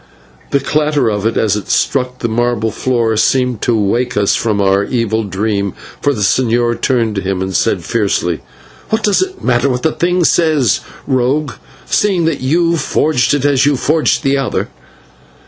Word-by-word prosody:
The 140 - +2
clatter 150 -3 0
of 105 +1 -1
it 115 - -1
as 105 -2 +2
it 105 -3 -6
struck 125 -2 0
the 115 - 0
marble 115 -1 0
floor 115 -1 0
seemed 125 0 +1
to 120 -2 +1
wake 120 +5 0
us 100 -1 +2
from 110 -3 -1
our 100 0 +2
evil 115 -2 -1
dream, 100 0 -2 0.3
for 145 - +2
the 115 -7 -3
señor 120 +1 +1
turned 115 -6 0
on - - -6
him, 95 -1 -2
and 95 0 -3
said - - +1
fiercely: 100 -6 -1 0.5
"What 220 0 0
does 205 - +2
it 380 0 -4
matter 125 +2 +2
what 125 -1 -2
the 160 - +2
thing 180 +2 0
says, 155 - +2 0.3
rogue, 135 +2 0 0.3
seeing 190 -5 +1
that 160 -5 -1
you 165 +5 +1
forged 150 -4 +1
it 145 -1 -1
as 140 -1 +3
you 145 - +3
have 130 - -3
forged 155 +1 +1
the 140 0 +1
other?" 135 - -2
125 Hz, 180 wpm, -15 LUFS, 110-145 Hz, 0.5 s, as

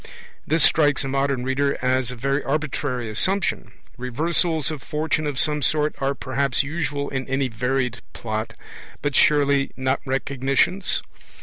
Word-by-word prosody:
This 160 +1 +3
strikes 145 -3 +4
a - - -3
modern 135 -1 0
reader 140 +2 0
as 130 -1 +1
a 125 - -5
very 135 +4 -1
arbitrary 140 -4 -2
assumption. 190 - -1 0.3
Reversals 160 +4 0
of 150 -3 -6
Fortune 155 +1 -1
of 145 -3 -3
some 150 +2 +1
sort 150 +2 +1
are 140 +1 0
perhaps 135 0 0
usual 145 -1 -2
in 130 -1 -3
any 135 0 0
varied 125 +1 -1
plot, 110 -1 -4 0.5
but 140 -2 -1
surely 140 -2 +4
not 130 +1 0
Recognitions? 135 +7 +1
140 Hz, 140 wpm, -23 LUFS, 130-150 Hz, 0.5 s, strikes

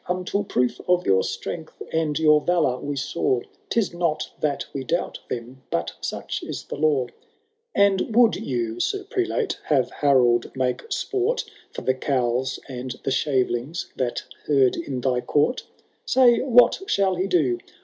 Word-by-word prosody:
Until 185 +3 -1
proof 125 -10 0
of 180 0 +3
your 95 -1 +4
strengUi 160 -2 -4 0.2
and 160 -3 0
your 150 -1 +5
valour 155 -8 +1
we 145 +2 -4 0.2
Baw~ 125 -2 +1 0.3
*Tis 225 -6 +1
not 170 -3 -1
that 145 -2 -1
we 135 - -3
doubt 170 +6 -2
them, 125 +2 -6
but 85 0 -2
such - - -4
is - - -5
the - - -6
law. 145 -4 +2
^ - - -12
^ - - -20 0.6
And 200 +2 +3
would 235 -2 +6
you. 120 -3 -3
Sir 395 -1 -1
Prelate, 390 0 -1
have 135 -5 +2
Harold 125 -5 +3
make 130 -1 0
sport 410 +5 0 0.3
For - - -6
the 130 - +2
cowls 130 -1 0
and 130 -1 -5
the 135 - -1
shavelings 130 +2 -1
that 125 -2 -2 0.2
herd 135 -4 +4
in 135 -6 -4
thy 125 -1 +1
court 150 - +1 0.2
.' - - -42
Say 250 -2 +5
what 245 +5 +5
shall 195 -1 +2
he 185 +2 -1
do 150 -10 +2
150 Hz, 165 wpm, -24 LUFS, 125-185 Hz, 0.6 s, would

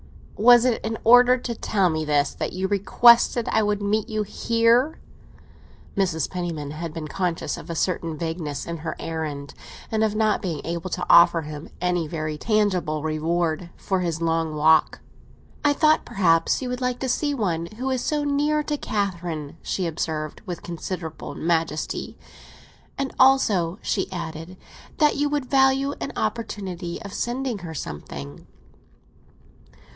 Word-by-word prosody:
"Was 240 +2 +6
it 245 -3 +1
in 225 0 -2
order 245 +2 +7
to 245 -1 -4
tell 195 -5 +1
me 155 0 -1
this 145 -2 +1
that - - -4
you 185 +1 -1
requested 235 +4 +4
I 220 - +3
would 205 -1 0
meet 210 +1 0
you 215 -1 -1
here?" 230 +7 +2 1.0
Mrs. 180 -5 0
Penniman 170 -5 -4
had 160 +2 -5
been 155 -1 -6
conscious 175 +1 -2
of - - -10
a 170 - -3
certain 165 -2 -1
vagueness 160 -4 -4
in 170 0 -4
her 160 - -5
errand, 150 -4 -5 0.4
and 220 0 +1
of 215 -1 0
not 215 -1 +2
being 165 -6 -3
able 170 +2 -3
to 180 0 -3
offer 170 -1 +6
him 150 0 -8
any 180 -2 0
very 155 -1 -4
tangible 185 -8 0
reward 160 +2 -1
for 190 -1 -1
his 170 -3 -2
long 165 -1 0
walk. 155 +1 +3 0.6
"I 290 -1 +4
thought 310 +1 +3
perhaps 170 +4 +2
you 250 - -3
would 250 +1 -4
like 250 -1 0
to 265 - -1
see 290 +3 0
one 170 -8 -1
who 260 +2 -2
is 255 -2 -1
so 300 -1 0
near 295 +1 +1
to 295 0 -2
Catherine," 175 - -3
she 185 - -2
observed, 155 -2 -3
with 175 -2 -5
considerable 170 -1 -6
majesty. 165 -2 -2 0.8
"And 275 -1 -3
also," 210 -10 +4
she 195 -1 -1
added, 165 0 -6 0.4
"that 300 -2 +3
you 290 +1 +1
would 290 -2 -1
value 270 +1 +3
an - - -3
opportunity 190 -6 -3
of 200 -1 -8
sending 245 -1 -2
her 165 -3 -8
something." 75 - -7
180 Hz, 155 wpm, -24 LUFS, 160-235 Hz, 1.0 s, order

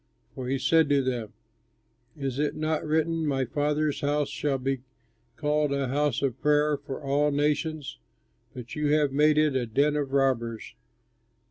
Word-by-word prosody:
For 130 -1 -6
he 135 +2 0
said 150 +3 +3
to 140 -1 +3
them, 120 -5 -3 0.9
"Is 135 -2 -3
it 150 0 0
not 155 0 -1
written, 160 +1 0
'My 135 -3 0
house 145 -1 0
shall 140 +1 -1
be 135 0 -2 0.5
called 150 0 0
a 140 -2 -1
house 145 -1 0
of 135 -2 -1
prayer 150 0 +3
for 140 -1 -7
all 145 +2 +2
nations'? 150 0 -1 0.6
But 120 -2 -8
you 150 -1 0
have 150 -2 +2
made 150 +2 +3
it 155 -3 +3
a 125 -2 0
den 145 +6 +2
of 145 -2 -2
robbers!" 120 -6 0
145 Hz, 155 wpm, -27 LUFS, 135-150 Hz, 0.9 s, said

